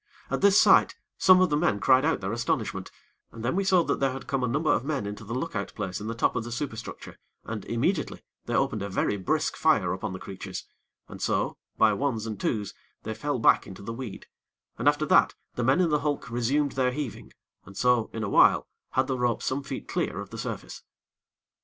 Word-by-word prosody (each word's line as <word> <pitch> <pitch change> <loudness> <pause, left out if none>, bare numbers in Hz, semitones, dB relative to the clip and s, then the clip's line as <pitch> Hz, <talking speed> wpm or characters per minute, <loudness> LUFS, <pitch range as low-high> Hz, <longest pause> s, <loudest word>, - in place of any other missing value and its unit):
At - - -1
this 200 0 +6
sight, - - +5 0.2
some 185 0 +7
of 185 -4 +3
the - - +3
men 150 -9 +1
cried 130 +6 +4
out 160 -8 +1
their 95 +2 -2
astonishment, 120 0 -2 0.4
and 115 0 -8
then 130 - 0
we 195 - +1
saw 185 -2 +4
that - - -1
there 135 -1 +1
had 135 - -7
come 135 -2 -1
a - - +1
number 150 +6 +1
of 115 - 0
men 140 -6 -2
into 105 +2 -6
the 115 +3 -5
look 165 +5 -3
out - - -4
place 95 -2 -4
in 105 - -5
the 115 - -3
top 115 - +1
of - - -1
the 120 - -7
superstructure, 120 -2 -6 0.2
and, 110 -3 -6
immediately, 150 +8 -1 0.2
they 120 - -1
opened 135 -6 +1
a 100 - -3
very 100 +1 0
brisk 155 - -1
fire 105 - +2
upon 95 - -4
the 95 - -5
creatures, 95 +2 -7 0.4
and - - -10
so, - - 0 0.2
by 110 -1 +5
ones 115 -2 -1
and 110 -3 -5
twos 105 -3 -2 0.3
they 110 - -3
fell 145 +5 -2
back 115 - +4
into 100 0 -10
the 115 - -5
weed, 115 -4 -7 0.5
and - - 0
after - - +3
that, - - +4 0.2
the 120 - -2
men 130 +7 +3
in 180 -2 +3
the 150 - +3
hulk 145 -4 -2
resumed 135 +5 +1
their 130 -1 +1
heaving, 130 -4 -6 0.3
and 100 +1 -12
so, 125 -2 +2
in 110 - -4
a 100 - -2
while, - - +5 0.3
had 130 - +2
the 130 -1 -2
rope 120 -1 0
some 130 +2 -1
feet 135 - -6
clear - - -2
of - - -8
the - - -7
surface. - - -6
125 Hz, 225 wpm, -27 LUFS, 110-145 Hz, 0.5 s, some